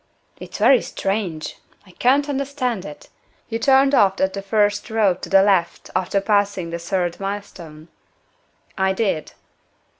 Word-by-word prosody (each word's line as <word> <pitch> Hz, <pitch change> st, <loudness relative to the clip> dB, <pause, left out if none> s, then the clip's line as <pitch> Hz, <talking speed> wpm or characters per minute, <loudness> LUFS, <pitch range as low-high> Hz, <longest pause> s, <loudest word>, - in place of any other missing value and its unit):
"It's -, -, -8 dB
very 265 Hz, -2 st, +5 dB
strange! 195 Hz, -6 st, -3 dB, 0.3 s
I 185 Hz, -, -17 dB
can't 270 Hz, +9 st, +2 dB
understand 270 Hz, -6 st, -2 dB
it. 150 Hz, -, -11 dB, 0.4 s
You 225 Hz, 0 st, -3 dB
turned 270 Hz, +2 st, +4 dB
off 195 Hz, -7 st, +3 dB
at 190 Hz, 0 st, +1 dB
the 195 Hz, -, -4 dB
first 205 Hz, 0 st, 0 dB
road 210 Hz, -5 st, +1 dB
to -, -, -7 dB
the 195 Hz, 0 st, +5 dB
left, 190 Hz, -4 st, 0 dB
after 185 Hz, +2 st, 0 dB
passing 200 Hz, -4 st, 0 dB
the 170 Hz, -, -4 dB
third 175 Hz, 0 st, -2 dB
milestone?" 195 Hz, -6 st, -7 dB, 0.9 s
"I 190 Hz, 0 st, +2 dB
did." 190 Hz, -6 st, -2 dB
200 Hz, 145 wpm, -21 LUFS, 185-225 Hz, 0.9 s, very